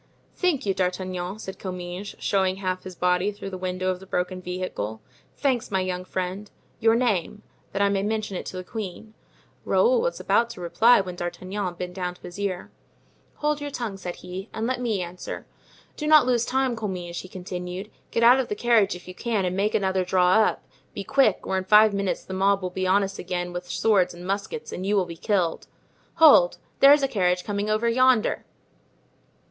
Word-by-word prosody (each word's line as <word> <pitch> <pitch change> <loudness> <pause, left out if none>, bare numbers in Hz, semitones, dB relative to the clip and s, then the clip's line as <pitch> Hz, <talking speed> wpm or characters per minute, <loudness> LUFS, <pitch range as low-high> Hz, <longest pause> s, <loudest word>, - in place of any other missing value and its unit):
"Thank 355 - 0
you, 195 - +1
D'Artagnan," 185 0 -2
said 190 -3 -8
Comminges, 180 +1 -6
showing 190 -2 +1
half 185 -1 -2
of - - -28
his 185 -1 -8
body 180 +3 +1
through 195 -1 -8
the - - -5
window 185 0 -2
of 180 - -5
the 190 - -13
broken 185 0 -2
vehicle, 180 - -4 0.4
"thanks, 260 -5 0
my 190 -2 0
young 185 0 -3
friend; 185 +3 -4 0.3
your 225 0 +4
name—that 210 -3 -2
I - - +4
may 200 -1 +1
mention 210 -1 -2
it - - -5
to 185 - -6
the 185 - -5
queen." 215 +1 -7 0.5
Raoul 485 0 +3
was - - -1
about 235 0 +2
to 235 - -9
reply 200 +7 +4
when 180 -2 -7
D'Artagnan 185 +2 -4
bent 180 0 -5
down 180 -1 -3
to - - -23
his 175 +3 -9
ear. 190 -3 -3 0.6
"Hold 300 0 -1
your 290 - -3
tongue," 235 -7 -4
said 180 -2 -6
he, 185 +3 -8
"and 220 - -3
let 250 +1 -1
me 220 -6 0
answer. 175 +1 -7 0.5
Do 300 - -4
not 305 -3 +7
lose 240 -2 +2
time, 260 -1 0
Comminges," 180 -6 -4
he - - -11
continued; 180 +2 -6 0.2
"get 230 - 0
out 245 +3 +7
of 260 - -1
the 210 - -3
carriage 215 -4 +3
if 175 - -12
you 180 - -7
can 215 -1 -1
and 180 0 -1
make 200 +2 0
another 190 -2 +1
draw 180 0 +3
up; 220 +2 +3 0.3
be 200 - -4
quick, 240 -2 +2
or 190 - 0
in - - -4
five 210 +2 +6
minutes 200 -1 -1
the 190 - -7
mob 195 +1 +2
will 180 - -3
be 185 +1 -2
on 200 +2 +4
us 195 0 -5
again 175 0 -3
with 175 0 -6
swords 195 -6 +2
and 175 +1 -10
muskets 200 - -3
and 185 - -5
you 200 +2 +1
will 190 -2 +2
be 170 -1 -8
killed. 175 -1 -1 0.5
Hold! 300 - +7 0.2
there's 285 +1 +7
a - - +3
carriage 180 -6 +1
coming 205 0 -2
over 215 +2 +1
yonder." 250 -1 +3
195 Hz, 205 wpm, -25 LUFS, 180-220 Hz, 0.6 s, not